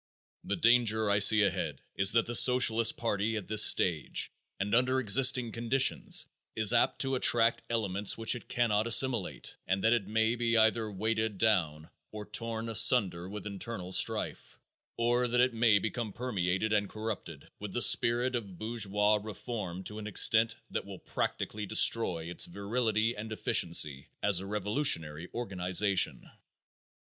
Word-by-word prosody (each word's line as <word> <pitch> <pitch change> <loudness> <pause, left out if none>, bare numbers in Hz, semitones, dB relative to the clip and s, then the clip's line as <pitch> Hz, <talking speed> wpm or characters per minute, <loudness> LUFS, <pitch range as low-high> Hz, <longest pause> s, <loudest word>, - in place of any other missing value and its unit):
The - - -3
danger 110 -3 +1
I 100 - +2
see 105 +1 +6
ahead 100 - -3 0.2
is 95 +2 +4
that 115 -1 +2
the 120 - -5
Socialist 115 -2 +4
party 110 -1 -2
at 105 - -8
this 110 0 +3
stage, 85 -5 +1 0.3
and 100 +1 -4
under 130 +2 +1
existing 125 +1 +2
conditions, 120 +4 0 0.3
is 110 0 +3
apt 120 - +1
to 135 0 -1
attract 115 -2 +2
elements 105 -3 -1
which 115 0 +1
it 120 - -9
cannot 115 -2 -1
assimilate, 115 -3 +1
and 95 +1 -2
that 110 - +3
it 110 -5 -2
may 110 +2 0
be 115 -1 -1
either 110 0 +1
weighted 110 +1 -3
down, 85 -8 -1 0.2
or 105 -1 -9
torn 115 +1 -5
asunder 110 -6 +3
with 105 +1 -9
internal 100 -2 -7
strife, - - -1 0.4
or 120 +1 0
that 120 +1 -1
it 125 0 +2
may 115 -2 +2
become 110 +1 -5
permeated 105 -3 -3
and 105 -2 -1
corrupted 110 0 -8
with - - -8
the - - -2
spirit 120 +2 +3
of 100 -7 -7
bourgeois 105 -1 -1
reform 105 -4 -7
to 105 +3 -7
an 105 - -8
extent 110 +2 +4 0.2
that - - -4
will 100 -1 -11
practically 105 +3 -5
destroy 100 -6 +2
its 90 +1 -3
virility 110 +4 -2
and 110 +2 -8
efficiency 70 -9 0 0.2
as 100 -3 +2
a 95 - -8
revolutionary 100 - -1
organization. 95 -3 -1
110 Hz, 155 wpm, -29 LUFS, 100-115 Hz, 0.4 s, see